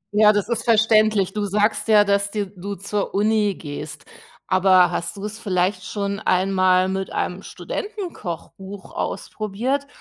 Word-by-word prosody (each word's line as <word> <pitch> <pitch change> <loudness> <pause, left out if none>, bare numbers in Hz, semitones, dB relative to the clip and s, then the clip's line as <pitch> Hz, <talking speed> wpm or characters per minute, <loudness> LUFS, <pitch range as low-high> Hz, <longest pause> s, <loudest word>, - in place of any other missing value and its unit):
Ja, 210 0 +7
das 205 -1 -1
ist 235 -1 -2
verständlich. 215 -3 +3
Du 210 - -2
sagst 210 +3 0
ja, 210 -2 +6
dass 200 0 +1
dir 205 0 -2
du 200 +1 -7
zur 200 +1 -3
Uni 210 -1 +2
gehst. 150 0 -8 0.4
Aber 185 -2 +4
hast 175 +3 -4
du 200 - -6
es 215 +1 -6
vielleicht 185 -1 0
schon 200 +1 -3
einmal 185 -1 +2
mit 190 0 -3
einem 180 +1 -3
Studentenkochbuch 200 - -7
ausprobiert? 240 +7 -3
200 Hz, 145 wpm, -22 LUFS, 185-215 Hz, 0.4 s, Ja